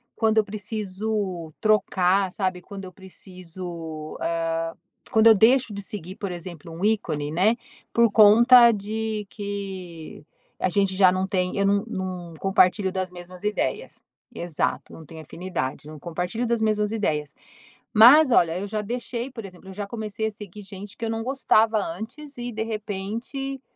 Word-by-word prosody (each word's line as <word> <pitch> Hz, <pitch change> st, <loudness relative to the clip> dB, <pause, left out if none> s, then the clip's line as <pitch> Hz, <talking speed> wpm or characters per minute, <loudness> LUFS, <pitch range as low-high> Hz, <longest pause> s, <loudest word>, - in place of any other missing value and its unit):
quando 220 Hz, -1 st, +1 dB
eu 220 Hz, -, +6 dB
preciso 205 Hz, -, -4 dB
trocar, 195 Hz, -3 st, +2 dB
sabe? 185 Hz, -2 st, -2 dB
Quando 195 Hz, +1 st, -9 dB
eu 185 Hz, -, -9 dB
preciso 175 Hz, -4 st, -8 dB
hã 165 Hz, 0 st, -1 dB, 0.4 s
quando 220 Hz, 0 st, +5 dB
eu 225 Hz, -, +9 dB
deixo 235 Hz, +2 st, +4 dB
de 200 Hz, -, -4 dB
seguir, 190 Hz, -2 st, -6 dB
por 200 Hz, -2 st, -5 dB
exemplo, 170 Hz, -2 st, -8 dB
um 170 Hz, +4 st, -7 dB
ícone, 180 Hz, -9 st, 0 dB
né? 195 Hz, +8 st, +3 dB, 0.4 s
Por 235 Hz, 0 st, +5 dB
conta 235 Hz, +3 st, +8 dB
de 215 Hz, 0 st, -3 dB
que 190 Hz, -7 st, -7 dB, 0.3 s
a -, -, +1 dB
gente 195 Hz, 0 st, +1 dB
já 185 Hz, -1 st, +6 dB
não 185 Hz, +1 st, -1 dB
tem 185 Hz, -2 st, -1 dB
eu 200 Hz, -, +2 dB
não 200 Hz, +1 st, +2 dB
não 185 Hz, -5 st, -5 dB
compartilho 195 Hz, 0 st, +3 dB
das 185 Hz, -1 st, -3 dB
mesmas 180 Hz, +1 st, -11 dB
ideias. 210 Hz, 0 st, -2 dB, 0.3 s
Exato, 170 Hz, -3 st, -2 dB
não 160 Hz, -, -11 dB
tenho 160 Hz, +2 st, -10 dB
afinidade, 155 Hz, -4 st, -5 dB
não 155 Hz, -1 st, -10 dB
compartilho 180 Hz, -, -3 dB
das 235 Hz, -1 st, +1 dB
mesmas 215 Hz, -1 st, +1 dB
ideias. 150 Hz, -9 st, -2 dB, 0.6 s
Mas, 255 Hz, +6 st, +8 dB
olha, 170 Hz, -3 st, +3 dB
eu 200 Hz, -, -4 dB
já 215 Hz, +1 st, -2 dB
deixei 240 Hz, +3 st, -4 dB
por 225 Hz, -5 st, -8 dB
exemplo, 185 Hz, 0 st, -12 dB
eu -, -, -8 dB
já 205 Hz, +1 st, -5 dB
comecei 220 Hz, 0 st, -3 dB
a -, -, -3 dB
seguir 205 Hz, 0 st, -10 dB
gente 200 Hz, +2 st, -10 dB
que 230 Hz, -, -4 dB
eu 225 Hz, -, -2 dB
não 225 Hz, 0 st, -2 dB
gostava 225 Hz, -4 st, +3 dB
antes 220 Hz, -, -6 dB
e 245 Hz, 0 st, -4 dB
de 220 Hz, -1 st, -4 dB
repente, 225 Hz, +6 st, -5 dB
200 Hz, 165 wpm, -24 LUFS, 180-220 Hz, 0.6 s, eu